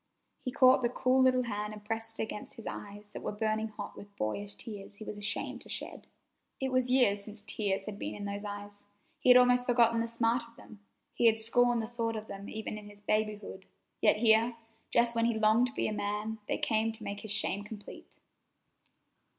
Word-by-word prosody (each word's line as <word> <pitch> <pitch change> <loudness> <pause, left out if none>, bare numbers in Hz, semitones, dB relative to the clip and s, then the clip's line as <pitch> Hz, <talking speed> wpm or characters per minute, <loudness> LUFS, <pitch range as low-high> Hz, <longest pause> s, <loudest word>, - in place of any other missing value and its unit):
He 255 - -2
caught 260 -1 +6
the 240 - +2
cool 255 +1 +2
little 255 -1 +4
hand 210 -2 -3
and 210 -1 -11
pressed 225 +1 -4
it - - +1
against 215 -1 -6
his 230 - -11
eyes 205 0 -7
that - - -7
were - - -3
burning 215 +1 -1
hot 210 -1 -8
with 200 0 -12
boyish 200 - -3
tears 205 -3 -7
he 215 - -9
was 215 - -6
ashamed 205 0 -3
to - - -10
shed. - - -6 0.5
It 265 -1 -1
was 255 -1 +2
years 225 -6 +4
since 210 0 -7
tears 200 -2 -1
had 210 -1 -6
been - - -4
in 205 -1 -6
those 200 0 -4
eyes. 205 0 -7 0.4
He 255 - +2
had 250 - +10
almost 250 0 +5
forgotten 235 -2 +4
the 230 - -1
smart 230 +1 +1
of 230 - -21
them. 215 -3 -14 0.3
He 235 - +4
had 225 0 +4
scorned 240 +1 +3
the - - -4
thought 230 -1 -2
of 215 0 -5
them 200 -1 -8
even 215 -1 -5
in 205 0 -11
his 205 0 -16
babyhood, 210 -2 -2 0.3
yet - - +5
here, 225 +1 +4 0.3
just 235 0 +3
when 230 0 +3
he 235 -1 +1
longed 220 +3 +4
to 250 - -7
be - - 0
a 215 - -2
man, 210 +2 -2
they - - 0
came 220 0 +1
to 220 0 -8
make 200 0 -4
his 215 0 -5
shame 205 -1 0
complete. 210 -1 -11
220 Hz, 215 wpm, -31 LUFS, 205-235 Hz, 0.5 s, had